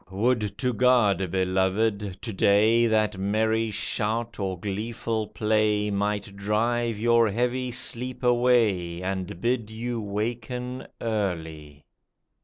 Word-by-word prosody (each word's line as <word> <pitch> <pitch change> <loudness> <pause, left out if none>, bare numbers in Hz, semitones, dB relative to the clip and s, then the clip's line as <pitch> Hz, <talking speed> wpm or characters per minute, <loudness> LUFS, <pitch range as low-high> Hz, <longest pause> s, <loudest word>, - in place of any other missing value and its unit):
would 105 +2 0
to 125 -2 0
God, 110 -6 +3
beloved, 95 +2 0
to 115 - -4
day 110 +5 +4
That 110 -3 +1
merry 110 +3 +1
shout 110 +2 -2
or 95 -3 -2
gleeful 110 +2 -3
play 105 -1 +1
Might 100 0 -2
drive 115 +3 0
your 115 0 +3
heavy 125 +4 -1
sleep 125 +1 -2
away, 115 -8 +2
And 95 -2 -4
bid 115 0 0
you 115 +1 -4
waken 120 +5 -4
early. 80 -9 -4
110 Hz, 110 wpm, -26 LUFS, 100-120 Hz, -, day